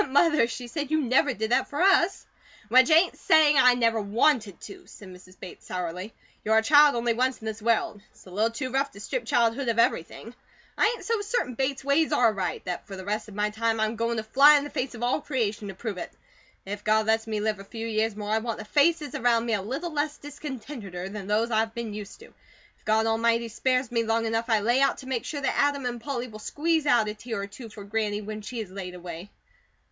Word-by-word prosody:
"But, -, -, -3 dB
Mother," 295 Hz, -2 st, +4 dB
she 245 Hz, +1 st, -6 dB
said, 285 Hz, +3 st, -4 dB
"you 315 Hz, 0 st, +2 dB
never 265 Hz, 0 st, +2 dB
did 220 Hz, -1 st, -3 dB
that -, -, +2 dB
for 285 Hz, -, -5 dB
us." 380 Hz, 0 st, +3 dB, 0.4 s
"Which 255 Hz, +5 st, +6 dB
ain't 330 Hz, +3 st, +4 dB
saying 305 Hz, -3 st, +4 dB
I 250 Hz, -1 st, +6 dB
never 230 Hz, -2 st, +1 dB
WANTED 215 Hz, -, +1 dB
to," 200 Hz, -, -11 dB
said 195 Hz, -, -13 dB
Mrs. 185 Hz, 0 st, -15 dB
Bates, 185 Hz, -, -11 dB
sourly. 180 Hz, +3 st, -5 dB, 0.3 s
"You're 220 Hz, +1 st, +3 dB
a 220 Hz, -, +3 dB
child 290 Hz, +2 st, +6 dB
only 235 Hz, 0 st, +1 dB
once 255 Hz, +2 st, 0 dB
in 220 Hz, -, -11 dB
this 220 Hz, 0 st, -5 dB
world; 220 Hz, -2 st, 0 dB
it's -, -, -21 dB
a 185 Hz, -, -13 dB
little 215 Hz, +5 st, +1 dB
too 255 Hz, +3 st, -5 dB
rough 275 Hz, +2 st, 0 dB
to 200 Hz, -, -12 dB
strip -, -, -4 dB
childhood 240 Hz, +3 st, +1 dB
of 230 Hz, -, 0 dB
everything. 230 Hz, +1 st, 0 dB, 0.4 s
I -, -, +3 dB
ain't -, -, -12 dB
so 455 Hz, -2 st, 0 dB
certain 410 Hz, -, -2 dB
Bates 265 Hz, +2 st, -2 dB
ways 290 Hz, +3 st, +2 dB
are 240 Hz, -7 st, +3 dB
right, 190 Hz, -3 st, -3 dB
that 180 Hz, -1 st, -5 dB
for 195 Hz, -, -8 dB
the 190 Hz, -1 st, -9 dB
rest 210 Hz, +2 st, -3 dB
of 210 Hz, -, -12 dB
my 210 Hz, 0 st, 0 dB
time 225 Hz, +1 st, -1 dB
I'm 220 Hz, +1 st, 0 dB
goin' 230 Hz, 0 st, -1 dB
to 220 Hz, -, -2 dB
fly 280 Hz, +7 st, +6 dB
in 285 Hz, -, -1 dB
the 290 Hz, -, -7 dB
face 255 Hz, -3 st, -3 dB
of 235 Hz, -, -7 dB
all 245 Hz, +5 st, +1 dB
creation 220 Hz, -8 st, -2 dB
to 195 Hz, -, -7 dB
prove 205 Hz, -2 st, -5 dB
it. -, -, -6 dB, 0.5 s
If 205 Hz, +1 st, -6 dB
God 215 Hz, 0 st, +2 dB
lets 220 Hz, +1 st, +1 dB
me 215 Hz, -1 st, -2 dB
live 210 Hz, -1 st, -1 dB
a -, -, -8 dB
few 225 Hz, +3 st, -7 dB
years 220 Hz, -1 st, -1 dB
more, 210 Hz, 0 st, -5 dB
I 220 Hz, -, +2 dB
want 230 Hz, 0 st, -4 dB
the 220 Hz, -, -8 dB
faces 300 Hz, +4 st, +2 dB
around 240 Hz, -5 st, +2 dB
me 230 Hz, -, -1 dB
a 205 Hz, -, 0 dB
little 275 Hz, -, -4 dB
less 295 Hz, 0 st, -1 dB
discontenteder 255 Hz, -, -7 dB
than 200 Hz, -2 st, -7 dB
those 220 Hz, +3 st, +1 dB
I've 220 Hz, +1 st, 0 dB
been 235 Hz, -3 st, -5 dB
used 210 Hz, -, -9 dB
to. -, -, -11 dB, 0.5 s
If -, -, -33 dB
God 220 Hz, +1 st, +2 dB
Almighty 230 Hz, +1 st, +1 dB
spares 255 Hz, +2 st, 0 dB
me 230 Hz, -1 st, +1 dB
long 225 Hz, 0 st, 0 dB
enough, 225 Hz, +1 st, -1 dB
I 220 Hz, -2 st, +3 dB
lay 240 Hz, +5 st, +2 dB
out 275 Hz, -, +2 dB
to 260 Hz, -, -10 dB
make 255 Hz, -3 st, -2 dB
sure 290 Hz, -2 st, -4 dB
that 270 Hz, -, 0 dB
Adam 285 Hz, -2 st, +1 dB
and 240 Hz, -1 st, -3 dB
Polly 255 Hz, -2 st, -4 dB
will 215 Hz, -2 st, -11 dB
squeeze 310 Hz, +6 st, -1 dB
out 235 Hz, -6 st, +4 dB
a 210 Hz, -, -3 dB
tear 225 Hz, -1 st, -5 dB
or -, -, -2 dB
two 225 Hz, +4 st, -11 dB
for 210 Hz, -1 st, -10 dB
Granny 210 Hz, 0 st, -2 dB
when 215 Hz, +1 st, -6 dB
she 235 Hz, +3 st, -6 dB
is 200 Hz, -4 st, -8 dB
laid 185 Hz, -2 st, -7 dB
away." 175 Hz, +1 st, -8 dB
230 Hz, 245 wpm, -26 LUFS, 210-270 Hz, 0.5 s, Which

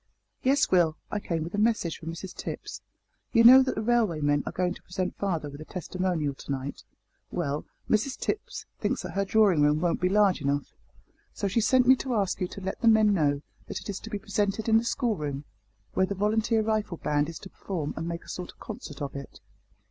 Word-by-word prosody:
"Yes, 275 Hz, +2 st, +3 dB
Will, 170 Hz, -4 st, +4 dB
I 210 Hz, -, -1 dB
came 165 Hz, -5 st, -2 dB
with 170 Hz, -, -7 dB
a 205 Hz, -, -1 dB
message 215 Hz, -7 st, +1 dB
from 165 Hz, -, -6 dB
Mrs 175 Hz, +3 st, -7 dB
Tipps. -, -, -6 dB, 0.5 s
You 230 Hz, -1 st, +6 dB
know 255 Hz, +3 st, +10 dB
that 260 Hz, -, 0 dB
the 220 Hz, -, -2 dB
railway 220 Hz, -8 st, +2 dB
men 145 Hz, -1 st, +2 dB
are -, -, -1 dB
going 180 Hz, -1 st, 0 dB
to -, -, -14 dB
present 180 Hz, 0 st, -3 dB
father 170 Hz, -7 st, -2 dB
with 145 Hz, +1 st, -9 dB
a -, -, -8 dB
testimonial 180 Hz, -4 st, -2 dB
to 135 Hz, -, -8 dB
night; 135 Hz, +1 st, -4 dB, 0.5 s
well, 150 Hz, -4 st, -2 dB, 0.2 s
Mrs 225 Hz, +5 st, +1 dB
Tipps 415 Hz, -, -3 dB
thinks -, -, -1 dB
that -, -, -5 dB
her 195 Hz, -, 0 dB
drawing 195 Hz, -6 st, +4 dB
room 150 Hz, +1 st, +4 dB
won't 175 Hz, +1 st, 0 dB
be 180 Hz, -, +3 dB
large 200 Hz, -3 st, +3 dB
enough, 140 Hz, 0 st, -1 dB, 0.6 s
so 200 Hz, -, -1 dB
she 200 Hz, +4 st, +1 dB
sent 255 Hz, +3 st, +4 dB
me 260 Hz, +2 st, +7 dB
to 255 Hz, -2 st, -2 dB
ask 195 Hz, -2 st, 0 dB
you 180 Hz, -, +1 dB
to 195 Hz, -, -9 dB
let 190 Hz, 0 st, -4 dB
the 230 Hz, -, +2 dB
men 215 Hz, -2 st, +6 dB
know 145 Hz, -5 st, +1 dB, 0.2 s
that -, -, -4 dB
it -, -, -10 dB
is 195 Hz, -, -3 dB
to 225 Hz, -, -9 dB
be 210 Hz, -, -2 dB
presented 205 Hz, +1 st, -1 dB
in 225 Hz, 0 st, +5 dB
the -, -, -3 dB
schoolroom, 155 Hz, -, -1 dB, 0.5 s
where 190 Hz, -, +2 dB
the 200 Hz, -, -3 dB
volunteer 220 Hz, +2 st, +1 dB
rifle 215 Hz, -5 st, -1 dB
band 150 Hz, 0 st, 0 dB
is 165 Hz, -, -7 dB
to 190 Hz, -, -11 dB
perform 165 Hz, -7 st, -4 dB
and 165 Hz, +1 st, -4 dB
make 170 Hz, 0 st, -4 dB
a -, -, -19 dB
sort 180 Hz, -1 st, -6 dB
of -, -, -31 dB
concert 145 Hz, -1 st, -7 dB
of 140 Hz, -, -5 dB
it." 140 Hz, -1 st, -8 dB
185 Hz, 225 wpm, -27 LUFS, 155-215 Hz, 0.6 s, know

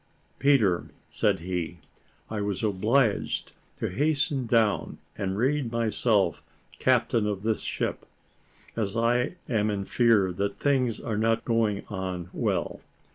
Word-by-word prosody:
"Peter," 110 Hz, -11 st, +3 dB, 0.2 s
said -, -, +1 dB
he, 90 Hz, -1 st, -3 dB, 0.5 s
"I 110 Hz, -1 st, -3 dB
was 100 Hz, +1 st, -2 dB
obliged 110 Hz, +3 st, +1 dB, 0.3 s
to -, -, -2 dB
hasten 145 Hz, -, 0 dB
down 110 Hz, -3 st, +2 dB, 0.2 s
and 95 Hz, 0 st, -2 dB
read 130 Hz, +1 st, +1 dB
myself 110 Hz, -, +1 dB, 0.4 s
captain 110 Hz, -3 st, +2 dB
of 100 Hz, -2 st, -3 dB
this 110 Hz, -1 st, 0 dB
ship, -, -, -3 dB, 0.7 s
as 110 Hz, -1 st, -2 dB
I 120 Hz, +6 st, +1 dB
am 110 Hz, -3 st, +1 dB
in 100 Hz, -2 st, -2 dB
fear 110 Hz, -7 st, +3 dB
that 100 Hz, +2 st, -2 dB
things 130 Hz, -5 st, +1 dB
are 110 Hz, -4 st, -3 dB
not 115 Hz, +1 st, +1 dB
going 110 Hz, -4 st, +1 dB
on 95 Hz, -2 st, -4 dB
well. -, -, -1 dB
110 Hz, 130 wpm, -27 LUFS, 100-120 Hz, 0.7 s, Peter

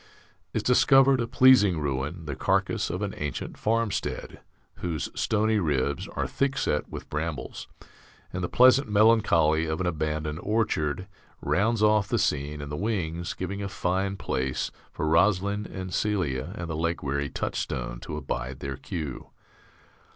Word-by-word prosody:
_) -, -, -25 dB, 0.5 s
is -, -, -2 dB
discovered 135 Hz, +1 st, +5 dB
a 115 Hz, -, -1 dB
pleasing 120 Hz, -8 st, +5 dB
ruin, 75 Hz, +4 st, -3 dB
the 70 Hz, -3 st, -4 dB
carcass -, -, 0 dB
of 90 Hz, +4 st, -3 dB
an 100 Hz, -, -3 dB
ancient 75 Hz, -2 st, -4 dB
farmstead, 115 Hz, -1 st, -2 dB, 0.4 s
whose 85 Hz, -4 st, -3 dB
stony 110 Hz, 0 st, +1 dB
ribs 70 Hz, -5 st, 0 dB
are -, -, 0 dB
thickset 135 Hz, -, -1 dB
with -, -, -8 dB
brambles; 75 Hz, 0 st, -4 dB, 0.7 s
and 90 Hz, 0 st, -3 dB
the 85 Hz, -, -1 dB
pleasant 130 Hz, 0 st, +5 dB
melancholy 100 Hz, -8 st, +4 dB
of 80 Hz, 0 st, -2 dB
an 95 Hz, -, -1 dB
abandoned 75 Hz, -2 st, -2 dB
orchard 95 Hz, -6 st, 0 dB, 0.3 s
rounds 110 Hz, +2 st, +1 dB
off 105 Hz, -2 st, +4 dB
the -, -, 0 dB
scene 75 Hz, +1 st, -1 dB
in 75 Hz, -, -6 dB
the 75 Hz, -, -4 dB
wings, 85 Hz, -3 st, -2 dB
giving 100 Hz, +2 st, -4 dB
a 100 Hz, -, -3 dB
fine 95 Hz, +1 st, -1 dB
place 65 Hz, -6 st, -2 dB, 0.2 s
for 80 Hz, -, -3 dB
Rosalind 100 Hz, +5 st, +2 dB
and 95 Hz, -1 st, -6 dB
Celia 90 Hz, -12 st, -1 dB
and 85 Hz, -, -4 dB
the 80 Hz, -, -3 dB
leg 85 Hz, +2 st, -1 dB
weary 70 Hz, +1 st, -1 dB
Touchstone -, -, -3 dB
to 75 Hz, -, -6 dB
abide 65 Hz, -3 st, -4 dB
their 70 Hz, -1 st, -5 dB
cue. 75 Hz, -7 st, -6 dB
90 Hz, 150 wpm, -27 LUFS, 75-105 Hz, 0.7 s, discovered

